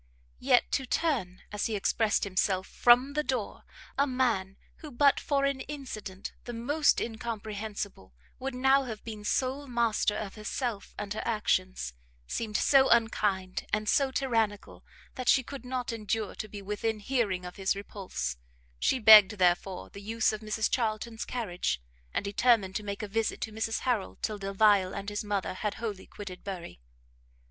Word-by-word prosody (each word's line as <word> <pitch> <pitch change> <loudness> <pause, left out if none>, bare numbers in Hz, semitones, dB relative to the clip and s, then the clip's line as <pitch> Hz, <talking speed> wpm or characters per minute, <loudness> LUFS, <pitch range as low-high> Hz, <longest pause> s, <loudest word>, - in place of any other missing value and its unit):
Yet - - +3
to 265 - 0
turn, 235 - -1
as 210 0 -1
he 220 - -2
expressed 210 +1 +1
himself, 190 -1 +1
from 245 +6 +4
the 300 - +1
door, 255 -7 -3 0.3
a 280 - +4
man 230 -8 0 0.2
who, 310 - -9
but 280 +2 +4
for 280 -1 +1
an 275 -1 0
incident 215 -9 -7
the 240 - -5
most 285 +7 +2
incomprehensible, 215 - -5 0.2
would 265 0 -4
now 265 +2 +4
have 220 -4 -6
been 215 -2 -7
sole 265 +6 -1
master 235 -4 +1
of 200 -3 -5
herself 215 0 -4
and 205 0 -4
her 215 - -3
actions, 185 - 0 0.3
seemed 215 - -2
so 270 -1 +5
unkind 205 -5 +1
and 215 +1 0
so 275 +5 +3
tyrannical, 225 -6 -1 0.3
that 255 -2 -2
she 260 - +5
could 275 +2 -8
not 250 -2 -3
endure 215 -1 -2
to 215 - -6
be 205 -1 -9
within 210 +2 -2
hearing 205 -6 -1
of 180 - -8
his 195 0 +1
repulse: 195 - -5 0.4
she - - +2
begged, 215 -3 +9
therefore, 180 0 +1
the 200 - -10
use 220 +2 +1
of 215 - -5
Mrs 215 0 0
Charlton's 225 -1 -2
carriage, 180 - -2 0.3
and - - -2
determined 205 -2 +3
to - - -5
make 200 +1 -4
a - - -3
visit 220 +2 -1
to 220 - -3
Mrs 220 +1 -2
Harrel 240 -6 -1
till 215 -2 -2
Delvile 195 -1 +3
and 200 +1 -4
his 205 +1 -3
mother 205 -3 -2
had 205 +2 -3
wholly 210 -4 -5
quitted 190 -3 -9
Bury. 180 - -7
215 Hz, 165 wpm, -29 LUFS, 200-245 Hz, 0.4 s, begged